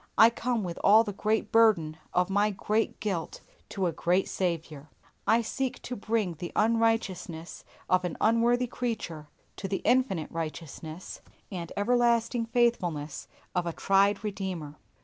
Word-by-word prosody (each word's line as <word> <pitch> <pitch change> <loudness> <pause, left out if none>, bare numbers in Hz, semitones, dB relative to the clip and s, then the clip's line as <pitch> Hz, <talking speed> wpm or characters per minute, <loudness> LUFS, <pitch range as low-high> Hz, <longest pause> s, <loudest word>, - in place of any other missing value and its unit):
I 225 +1 +8
come 235 -1 -1
with 175 -2 -5
all 215 +3 +7
the 205 -3 -5
great 215 +1 0
burden 205 -9 +4 0.2
of 180 +1 +1
my 205 +2 +3
great 210 +2 -1
guilt 190 -6 -3 0.3
to 195 -2 -2
a 175 - +1
great 180 +4 +1
Saviour. 160 -5 -3 0.4
I 230 +1 +4
seek 260 +3 -3
to 250 - -4
bring 215 -4 -1
the 170 +2 -7
unrighteousness 215 -7 0 0.2
of 185 0 +3
an 175 -3 -3
unworthy 235 +2 +3
creature 215 -11 -4 0.3
to 195 - -4
the 195 - -3
infinite 245 - +2
righteousness 160 +1 -6 0.3
and 170 -3 -5
everlasting 235 +1 +2
faithfulness 180 - 0 0.3
of 180 -1 0
a 170 - -2
tried 200 +3 +2
Redeemer. 185 -8 -4
200 Hz, 145 wpm, -28 LUFS, 170-230 Hz, 0.4 s, I